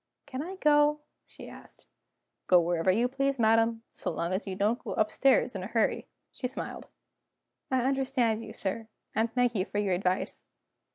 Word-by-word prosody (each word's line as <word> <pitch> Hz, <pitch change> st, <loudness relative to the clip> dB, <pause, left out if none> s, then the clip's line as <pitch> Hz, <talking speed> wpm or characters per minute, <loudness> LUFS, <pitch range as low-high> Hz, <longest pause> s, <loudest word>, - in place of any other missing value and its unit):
"Can 265 Hz, -1 st, -5 dB
I 365 Hz, +5 st, -6 dB
go?" 300 Hz, -3 st, +3 dB, 0.3 s
she -, -, -12 dB
asked. -, -, -14 dB, 0.6 s
"Go 180 Hz, -, +7 dB
wherever 175 Hz, +1 st, +2 dB
you 230 Hz, +6 st, +2 dB
please, 275 Hz, +1 st, -1 dB
madam 225 Hz, 0 st, +3 dB
so -, -, -4 dB
long 170 Hz, +2 st, -2 dB
as 195 Hz, +2 st, -2 dB
you 190 Hz, -, -3 dB
don't 210 Hz, +5 st, 0 dB
go -, -, -4 dB
upstairs 250 Hz, +4 st, +3 dB
in 190 Hz, -, -3 dB
a 185 Hz, -, -5 dB
hurry." 225 Hz, 0 st, 0 dB, 0.2 s
She 255 Hz, -, -4 dB
smiled: 260 Hz, -, -6 dB, 0.8 s
"I 260 Hz, -2 st, +1 dB
understand 260 Hz, -4 st, +1 dB
you, -, -, -8 dB
sir 220 Hz, +3 st, -3 dB, 0.3 s
and 225 Hz, +1 st, +1 dB
thank 245 Hz, 0 st, +2 dB
you 190 Hz, -5 st, +1 dB
for 205 Hz, -, -6 dB
your 200 Hz, -2 st, +1 dB
advice." 180 Hz, +1 st, -2 dB
230 Hz, 175 wpm, -29 LUFS, 195-265 Hz, 0.8 s, Go